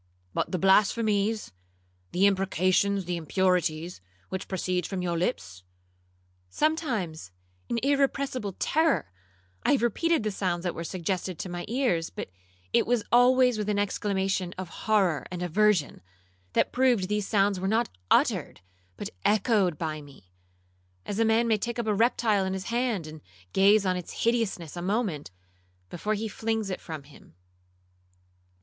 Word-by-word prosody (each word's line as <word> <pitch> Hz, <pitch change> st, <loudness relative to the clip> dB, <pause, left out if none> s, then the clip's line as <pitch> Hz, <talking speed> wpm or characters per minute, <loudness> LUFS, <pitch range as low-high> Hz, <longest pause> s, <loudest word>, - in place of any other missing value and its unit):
'—'But -, -, -1 dB
the 185 Hz, -, 0 dB
blasphemies, 210 Hz, -, +2 dB, 0.6 s
the 185 Hz, +3 st, +3 dB
imprecations, 195 Hz, 0 st, +2 dB
the 175 Hz, 0 st, -2 dB
impurities, 170 Hz, -, 0 dB, 0.3 s
which 190 Hz, 0 st, -4 dB
proceed 180 Hz, -2 st, -1 dB
from 190 Hz, -2 st, -3 dB
your 175 Hz, -1 st, -1 dB
lips?'—'Sometimes, 90 Hz, -, -4 dB, 0.4 s
in 235 Hz, -, 0 dB
irrepressible 275 Hz, -6 st, 0 dB
terror, 315 Hz, -, +1 dB, 0.5 s
I -, -, +3 dB
have 265 Hz, -, +1 dB
repeated 320 Hz, +5 st, +1 dB
the 215 Hz, -, -1 dB
sounds 180 Hz, -3 st, -2 dB
that 175 Hz, -, -1 dB
were 165 Hz, -, -5 dB
suggested 180 Hz, 0 st, -3 dB
to 185 Hz, -, -5 dB
my 175 Hz, 0 st, -5 dB
ears; 230 Hz, -10 st, 0 dB
but -, -, -7 dB, 0.4 s
it -, -, +3 dB
was 240 Hz, -2 st, +2 dB
always 250 Hz, -1 st, +5 dB
with 210 Hz, 0 st, -2 dB
an 205 Hz, -, +1 dB
exclamation 195 Hz, -2 st, -1 dB
of 185 Hz, -2 st, -5 dB
horror 190 Hz, -7 st, +1 dB
and 180 Hz, -1 st, -4 dB
aversion, 190 Hz, -2 st, +2 dB, 0.5 s
that -, -, +2 dB
proved 245 Hz, -7 st, +2 dB
these 210 Hz, 0 st, -1 dB
sounds 200 Hz, -2 st, +2 dB
were 190 Hz, -, -2 dB
not 225 Hz, +4 st, +2 dB, 0.2 s
uttered -, -, +2 dB, 0.4 s
but -, -, -5 dB
echoed 205 Hz, -, +2 dB
by 155 Hz, -1 st, -3 dB
me,—as 90 Hz, -, -12 dB
a 225 Hz, -, +4 dB
man 225 Hz, +1 st, +3 dB
may 220 Hz, -2 st, +2 dB
take 235 Hz, +4 st, -3 dB
up 235 Hz, -, -2 dB
a 215 Hz, -, +1 dB
reptile 220 Hz, -2 st, +2 dB
in 190 Hz, 0 st, -2 dB
his 190 Hz, +2 st, -5 dB
hand, 235 Hz, -8 st, 0 dB
and 155 Hz, 0 st, -10 dB, 0.3 s
gaze 200 Hz, +1 st, +5 dB
on 185 Hz, -1 st, +1 dB
its 180 Hz, -2 st, -5 dB
hideousness 225 Hz, -9 st, 0 dB
a 175 Hz, -, -5 dB
moment, 190 Hz, -6 st, -1 dB, 0.6 s
before 210 Hz, +5 st, -1 dB
he 220 Hz, +2 st, -3 dB
flings 220 Hz, -1 st, -2 dB
it 185 Hz, -, -4 dB
from 155 Hz, -4 st, -7 dB
him. 140 Hz, -, -18 dB
190 Hz, 150 wpm, -27 LUFS, 170-220 Hz, 0.6 s, always